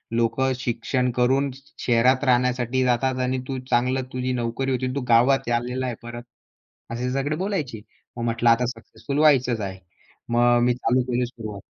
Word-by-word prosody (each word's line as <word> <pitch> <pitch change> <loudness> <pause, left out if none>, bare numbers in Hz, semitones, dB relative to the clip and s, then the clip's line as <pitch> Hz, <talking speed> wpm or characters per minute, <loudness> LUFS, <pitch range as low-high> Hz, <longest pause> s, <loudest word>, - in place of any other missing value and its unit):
लोकं 120 +3 +1
शिक्षण 125 +1 -1
करून 135 +3 +2 0.4
शहरात 125 +3 +3
राहण्यासाठी 125 0 +2
जातात 130 +1 +1
आणि 130 0 -1
तू 135 -1 -3
चांगलं 125 +2 +2
तुझी 125 0 -2
नोकरी 125 +2 -2
होती 130 0 -1
आणि 130 +1 -3
तू 140 - -1
गावात 125 +2 +4
आलेला 125 +2 -4
आहे 120 - -3
परत," 120 0 -7 0.7
असे 125 +2 -2
सगळे 140 +3 -1
बोलायचे. 145 - -3 0.4
मग 115 - -3
म्हटलं 115 0 +2
आता 125 +2 +3
सक्सेसफुल 125 +4 -6
व्हायचंच 130 -6 +4
आहे. 95 -2 -5 0.5
मग 120 0 +4
मी 125 - +3
चालू 125 +1 +1
केली 125 +1 +1
सुरुवात. 110 -4 -8
125 Hz, 165 wpm, -24 LUFS, 120-130 Hz, 0.7 s, गावात